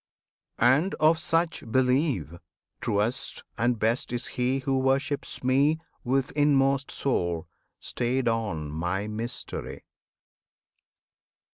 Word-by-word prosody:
And 135 Hz, +11 st, +3 dB
of 160 Hz, +1 st, +4 dB
such 165 Hz, 0 st, 0 dB
believe, 125 Hz, -, +1 dB, 0.4 s
Truest 105 Hz, +5 st, -1 dB
and 120 Hz, +1 st, +1 dB
best 115 Hz, +6 st, 0 dB
is 120 Hz, -1 st, -2 dB
he 125 Hz, +2 st, +1 dB
who 135 Hz, 0 st, 0 dB
worships 135 Hz, +2 st, 0 dB
Me 140 Hz, +5 st, +3 dB, 0.3 s
With 130 Hz, +2 st, 0 dB
inmost 140 Hz, -2 st, +3 dB
soul, 85 Hz, -11 st, -1 dB, 0.3 s
stayed 125 Hz, +1 st, -1 dB
on 105 Hz, -10 st, -1 dB
My 90 Hz, +6 st, -2 dB
Mystery! 110 Hz, +3 st, -5 dB
130 Hz, 100 wpm, -27 LUFS, 110-140 Hz, 0.4 s, of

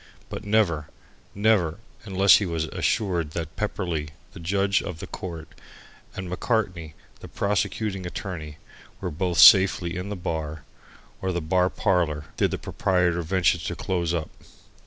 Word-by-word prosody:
But -, -, -6 dB
never, 100 Hz, -8 st, +1 dB, 0.5 s
never 100 Hz, -6 st, +2 dB, 0.3 s
unless 95 Hz, -1 st, +6 dB
he 100 Hz, -, -1 dB
was 80 Hz, -2 st, -1 dB
assured 85 Hz, -4 st, -1 dB
that 80 Hz, -2 st, -5 dB
Pepperleigh, 85 Hz, -7 st, -2 dB, 0.3 s
the -, -, -10 dB
judge 95 Hz, +3 st, +1 dB
of 90 Hz, -, -6 dB
the -, -, -7 dB
court, 85 Hz, -3 st, -7 dB, 0.7 s
and 95 Hz, -1 st, -5 dB
Macartney, 90 Hz, -5 st, -2 dB, 0.2 s
the -, -, -10 dB
prosecuting 100 Hz, -1 st, -1 dB
attorney, 80 Hz, -6 st, -6 dB, 0.4 s
were -, -, -4 dB
both 85 Hz, +3 st, -2 dB
safely 95 Hz, -3 st, +7 dB
in 90 Hz, +3 st, -4 dB
the 105 Hz, -, -3 dB
bar, 80 Hz, -5 st, -4 dB, 0.6 s
or 95 Hz, -, -1 dB
the 90 Hz, -, -1 dB
bar 90 Hz, +3 st, +2 dB
parlour, 85 Hz, -9 st, 0 dB
did -, -, +2 dB
the -, -, -3 dB
proprietor 90 Hz, -2 st, 0 dB
venture 90 Hz, +1 st, +2 dB
to -, -, -4 dB
close 85 Hz, -3 st, -1 dB
up. 80 Hz, -3 st, -2 dB
90 Hz, 145 wpm, -25 LUFS, 80-95 Hz, 0.7 s, safely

